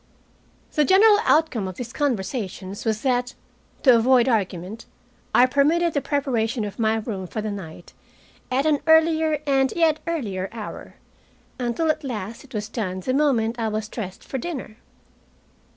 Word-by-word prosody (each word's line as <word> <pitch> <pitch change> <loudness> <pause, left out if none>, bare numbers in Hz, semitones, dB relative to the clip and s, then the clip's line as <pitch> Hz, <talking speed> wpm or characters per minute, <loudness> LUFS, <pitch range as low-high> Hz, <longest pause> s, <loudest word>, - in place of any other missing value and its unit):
The 300 - +3
general 410 +5 +6
outcome 295 -11 +2
of 185 - -6
these 240 +3 -7
conversations 205 -7 -3
was 220 -1 -1
that, 250 -1 0 0.5
to 255 -3 +7
avoid 245 +1 +4
argument, 200 -2 -2 0.5
I 250 - +7
permitted 300 +6 +2
the 285 - 0
preparation 245 -6 -1
of 205 +3 -8
my 220 -1 +2
room 210 -4 -4
for 215 - -5
the 215 0 -3
night 175 -4 -9 0.6
at 265 +3 +1
an 300 -2 +3
earlier 320 -1 +4
and 270 -2 +2
yet 320 -2 +3
earlier 200 - -2
hour, 220 -2 -8 0.6
until 255 +7 +1
at 310 - -6
last 225 -4 -5
it 270 -3 -13
was 210 0 -3
done 190 -5 -4
the 255 - -1
moment 245 -5 +1
I 225 - 0
was 215 0 -3
dressed 200 -4 -7
for 265 - -5
dinner. 260 -7 -6
245 Hz, 155 wpm, -23 LUFS, 215-290 Hz, 0.6 s, to